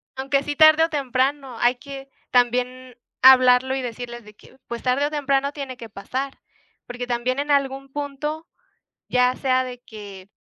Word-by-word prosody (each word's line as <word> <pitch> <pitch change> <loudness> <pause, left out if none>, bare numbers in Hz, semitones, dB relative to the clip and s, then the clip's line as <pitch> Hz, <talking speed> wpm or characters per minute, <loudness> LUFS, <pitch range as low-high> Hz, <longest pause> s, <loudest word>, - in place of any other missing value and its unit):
Aunque 275 +1 0
sí 290 0 -4
tarde 310 +1 +7
o 325 - +1
temprano, 270 -2 -1
hay 240 +1 +3
que 275 +1 -10 0.2
también 250 +1 0 0.3
hablarlo 255 0 +6
y 270 - -2
decirles 240 0 -7
de 210 0 -15
que, 260 - -20
pues, 235 0 -6
tarde 255 +3 +1
o - - -4
temprano 280 -1 0
tiene 275 -3 -6
que 230 -2 -10
pasar. 260 +7 -5 0.5
Porque 245 0 -6
también 245 +2 -1
en 290 +1 -3
algún 275 -1 0
punto, 295 +3 -5 0.6
ya 250 0 +2
sea 260 -1 +1
de 250 -1 -8
que, 200 -4 -11
260 Hz, 165 wpm, -22 LUFS, 245-275 Hz, 0.6 s, tarde